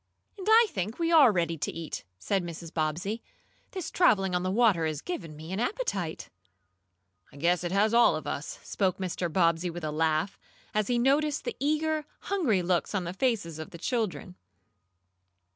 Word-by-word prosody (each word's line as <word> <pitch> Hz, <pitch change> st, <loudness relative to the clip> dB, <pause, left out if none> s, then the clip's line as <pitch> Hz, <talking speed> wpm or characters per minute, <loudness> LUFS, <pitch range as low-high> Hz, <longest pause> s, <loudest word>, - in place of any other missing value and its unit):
"And 395 Hz, -1 st, -8 dB
I 455 Hz, +2 st, +8 dB
think 210 Hz, -, -3 dB
we 335 Hz, 0 st, 0 dB
are 295 Hz, -8 st, +7 dB
ready 170 Hz, -4 st, -1 dB
to -, -, -2 dB
eat," 165 Hz, -, -6 dB
said 195 Hz, -, -1 dB
Mrs. 170 Hz, -1 st, -8 dB
Bobbsey. 175 Hz, +8 st, -2 dB, 0.5 s
"This 370 Hz, -5 st, -5 dB
traveling 195 Hz, -, +3 dB
on 180 Hz, -, +1 dB
the 185 Hz, -, -1 dB
water 195 Hz, -6 st, +3 dB
has 155 Hz, -2 st, -3 dB
given 165 Hz, -, -6 dB
me 160 Hz, +3 st, -9 dB
an 190 Hz, -, -2 dB
appetite." 230 Hz, -, -2 dB, 1.0 s
"I -, -, -14 dB
guess 175 Hz, +4 st, +1 dB
it 175 Hz, -, -2 dB
has 210 Hz, +3 st, +2 dB
all 235 Hz, -8 st, +6 dB
of 155 Hz, -, -5 dB
us," 145 Hz, -, -4 dB
spoke 190 Hz, -3 st, 0 dB
Mr. 180 Hz, -2 st, -3 dB
Bobbsey 170 Hz, 0 st, +2 dB
with 175 Hz, 0 st, -7 dB
a 155 Hz, -, -2 dB
laugh, 160 Hz, +4 st, 0 dB, 0.3 s
as 215 Hz, -1 st, +1 dB
he 245 Hz, -, +1 dB
noticed 285 Hz, +4 st, +2 dB
the -, -, -4 dB
eager, 310 Hz, +1 st, 0 dB, 0.2 s
hungry 270 Hz, -, +1 dB
looks 180 Hz, +3 st, 0 dB
on 190 Hz, -, 0 dB
the 175 Hz, +1 st, -4 dB
faces 195 Hz, -, -1 dB
of 155 Hz, -, -6 dB
the -, -, -10 dB
children. 210 Hz, -2 st, -2 dB
190 Hz, 180 wpm, -28 LUFS, 165-245 Hz, 1.0 s, I